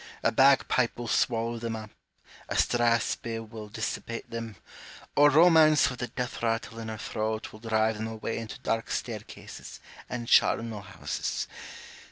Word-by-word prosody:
A - - +3
bagpipe 135 -1 +4
will 120 0 -5
swallow 115 0 +1
them 115 0 -3
up, 110 -1 -8 0.6
a - - -2
strathspey 115 -1 +1
will 110 -1 -9
dissipate 115 +2 -4
them, 115 -2 -5 0.6
or 145 +1 +7
Romance 155 -1 +6
with 125 - -8
the 125 - -2
death 125 +1 -4
rattle 115 0 -1
in 115 - -6
her 110 0 -5
throat 110 0 -3
will 110 - -11
drive 110 -1 +1
them 110 +1 -3
away 110 0 -4
into 115 -1 -7
dark 115 0 -1
staircases - - -6 0.3
and 120 -1 -4
charnel 115 -3 +3
houses. - - -4
115 Hz, 150 wpm, -28 LUFS, 110-120 Hz, 0.6 s, or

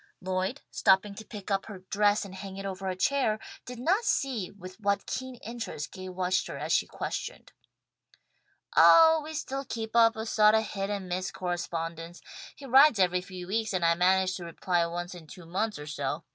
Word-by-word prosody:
Lloyd, 185 +7 -2
stooping 195 +2 +3
to 220 - -9
pick 210 -2 -8
up 195 0 0
her 195 -4 -9
dress 205 0 +3
and 195 - -10
hang 190 0 -8
it 195 - -6
over 195 0 -4
a 185 - -2
chair, 225 +1 +1 0.3
did 250 0 -7
not 360 - +1
see 250 - 0
with 185 0 -12
what 200 -1 0
keen 260 0 -5
interest 225 -10 -6
Gay 185 0 -8
watched 185 0 0
her - - -6
as - - -4
she - - +3
questioned. - - -5 1.2
"Oh, 320 -1 +7
we 315 +1 -7
still 275 -2 -3
keep 225 -3 -6
up 230 -1 +6
a 220 0 -4
sawt 215 -1 +4
of 220 -1 +1
hit 195 -1 -3
and 200 -2 -3
miss 185 +1 -2
correspondence. 170 -2 -4 0.4
He 280 - -11
writes 270 0 +6
every 180 -1 +2
few 180 -1 -8
weeks 220 +1 -1
and 180 -2 +1
I 165 - +5
manage 185 +2 +2
to 180 - -8
reply 170 +1 0
once 175 +2 -5
in 170 -3 -12
two 180 +1 -12
months 205 +6 -2
or 150 - -8
so. 150 - -3
195 Hz, 200 wpm, -28 LUFS, 180-225 Hz, 1.2 s, Oh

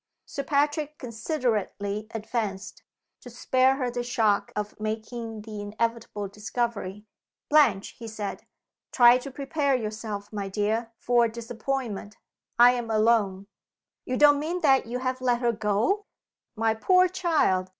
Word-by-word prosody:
Sir 280 - -5
Patrick 295 +2 0
considerately 220 - -2
advanced, 210 -3 -4 0.4
to 245 - -11
spare 255 +2 +2
her 255 -3 -2
the 245 0 -2
shock 225 -4 +1
of 210 0 -4
making 220 0 -5
the 215 -1 -7
inevitable 215 0 -3
discovery. 210 -1 -4 0.4
"Blanche," 260 -11 +4
he 230 - -7
said. 215 -2 -6 0.4
"Try 240 0 +7
to 275 - -7
prepare 280 +1 0
yourself, 215 -2 -5
my 200 -2 -3
dear, 220 +3 -1
for 240 -1 +3
a 225 - -2
disappointment. 235 -2 -4 0.4
I 240 +1 +8
am 240 -2 -3
alone." 215 -3 +2 0.6
"You 255 - -2
don't 290 0 +6
mean 340 +4 -3
that 270 -5 +4
you 240 +2 -3
have 255 0 -2
let 245 -2 +2
her 240 -1 +2
go?" 225 - 0 0.5
"My 225 0 +1
poor 365 +11 +4
child! 325 - +1
230 Hz, 140 wpm, -26 LUFS, 210-255 Hz, 0.6 s, I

